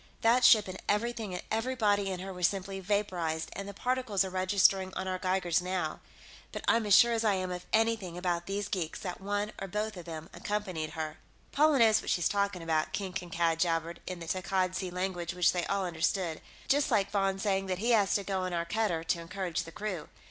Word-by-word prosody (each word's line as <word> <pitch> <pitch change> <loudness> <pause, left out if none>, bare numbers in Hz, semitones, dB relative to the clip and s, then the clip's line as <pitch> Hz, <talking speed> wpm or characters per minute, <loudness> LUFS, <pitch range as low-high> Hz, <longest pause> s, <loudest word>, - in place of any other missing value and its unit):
That 240 +3 +4
ship 215 -4 +7
and 185 0 -7
everything 215 -2 0
and - - -5
everybody 220 -4 +1
in 185 -1 -4
her 190 0 -6
were 180 - -9
simply 195 +1 0
vaporized, 180 -5 -1
and 200 0 -6
the - - -7
particles 250 -6 0
are 190 - -5
registering 190 0 +3
on 190 - -3
our 185 0 -2
geigers 185 -2 +1
now. 180 -3 -2 0.5
But - - -6
I'm 230 -2 +3
as 200 - +7
sure 235 -1 +6
as 230 0 0
I 210 -3 +3
am 185 -1 -2
of 180 0 -6
anything 220 -6 +1
about 175 -1 -1
these 200 0 -2
geeks 180 -6 -3
that 180 -1 -5
one 205 +2 -1
or 195 - -3
both 210 +3 -2
of 175 - -8
them 160 -1 -7
accompanied 185 -7 -3
her." 155 -1 -4 0.3
"Paula 300 0 +4
knows 220 -3 +5
what - - -6
she's 175 - +2
talking 200 -3 -1
about," 160 -1 0
King 190 -2 -3
Kankad 170 -2 0
jabbered 165 0 0
in 185 -1 -4
the 165 - -7
Takkad 185 +1 0
Sea 185 0 -3
language 180 -1 -3
which 180 -2 +4
they 175 -1 -2
all 200 -1 0
understood. 170 0 -1 0.3
"Just 285 +1 +3
like 200 -5 +2
Von 195 -1 +1
saying 195 -1 0
that 185 -1 -1
he 230 +5 0
has 210 -4 +4
to 200 - +1
go 195 -1 -2
on 185 -1 -3
our 170 0 -1
cutter, 175 -3 0
to 170 +1 0
encourage 180 0 -3
the 165 - -9
crew. 190 -4 -5
190 Hz, 220 wpm, -30 LUFS, 175-205 Hz, 0.5 s, ship